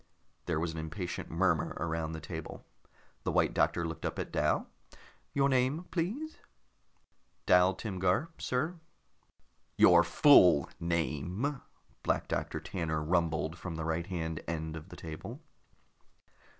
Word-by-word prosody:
There 85 Hz, -3 st, 0 dB
was 85 Hz, 0 st, -1 dB
an 80 Hz, -, -5 dB
impatient 85 Hz, +3 st, -5 dB
murmur -, -, +1 dB
around 80 Hz, 0 st, -2 dB
the 80 Hz, -, -5 dB
table. -, -, -7 dB, 0.6 s
The -, -, -2 dB
White -, -, +2 dB
Doctor 85 Hz, -1 st, +1 dB
looked 80 Hz, -2 st, -7 dB
up -, -, -2 dB
at -, -, -4 dB
Dal. -, -, +1 dB, 0.7 s
"Your 140 Hz, 0 st, +3 dB
name, 135 Hz, +5 st, +1 dB
please?" 225 Hz, -, -3 dB, 1.1 s
"Dal 90 Hz, +1 st, +5 dB
Timgar, 95 Hz, -, 0 dB
sir." 155 Hz, +8 st, -1 dB, 1.0 s
"Your 85 Hz, -1 st, +7 dB
full 85 Hz, -, +6 dB
name," 85 Hz, -, -1 dB, 0.4 s
Black -, -, 0 dB
Doctor -, -, -2 dB
Tanner 80 Hz, -4 st, -3 dB
rumbled 80 Hz, 0 st, 0 dB
from 90 Hz, -2 st, -5 dB
the 80 Hz, 0 st, -4 dB
right 80 Hz, +1 st, -1 dB
hand 80 Hz, -3 st, -3 dB
end 80 Hz, -1 st, -3 dB
of 80 Hz, +3 st, -9 dB
the 90 Hz, -, -10 dB
table. 80 Hz, -2 st, -7 dB
85 Hz, 130 wpm, -31 LUFS, 80-110 Hz, 1.1 s, Your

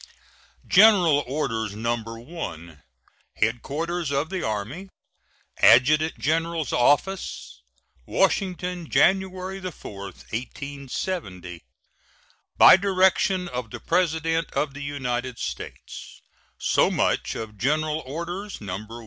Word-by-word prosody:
GENERAL 180 Hz, -8 st, +6 dB
ORDERS, 115 Hz, -7 st, -2 dB
No. 115 Hz, +2 st, 0 dB
1. 115 Hz, -, -8 dB, 0.5 s
HEADQUARTERS 150 Hz, +9 st, -1 dB
OF 145 Hz, +4 st, -1 dB
THE 190 Hz, -2 st, -2 dB
ARMY, 110 Hz, -, -4 dB, 0.7 s
ADJUTANT 155 Hz, +6 st, +5 dB
GENERAL'S 165 Hz, 0 st, -1 dB
OFFICE, 145 Hz, -, 0 dB, 0.5 s
Washington, 180 Hz, -3 st, 0 dB
January 190 Hz, +4 st, +1 dB
4, 150 Hz, -, -8 dB
1870. 125 Hz, -, -6 dB, 1.0 s
By -, -, +9 dB
direction 190 Hz, -1 st, +2 dB
of 125 Hz, -6 st, -5 dB
the -, -, -8 dB
President 165 Hz, -2 st, 0 dB
of 150 Hz, -2 st, -1 dB
the 145 Hz, -, -8 dB
United 130 Hz, -3 st, -3 dB
States, -, -, -8 dB, 0.3 s
so -, -, +2 dB
much -, -, 0 dB
of 105 Hz, -2 st, -7 dB
General 155 Hz, +4 st, 0 dB
Orders, 170 Hz, +8 st, -6 dB
No. 95 Hz, -2 st, -5 dB
150 Hz, 95 wpm, -24 LUFS, 120-180 Hz, 1.0 s, By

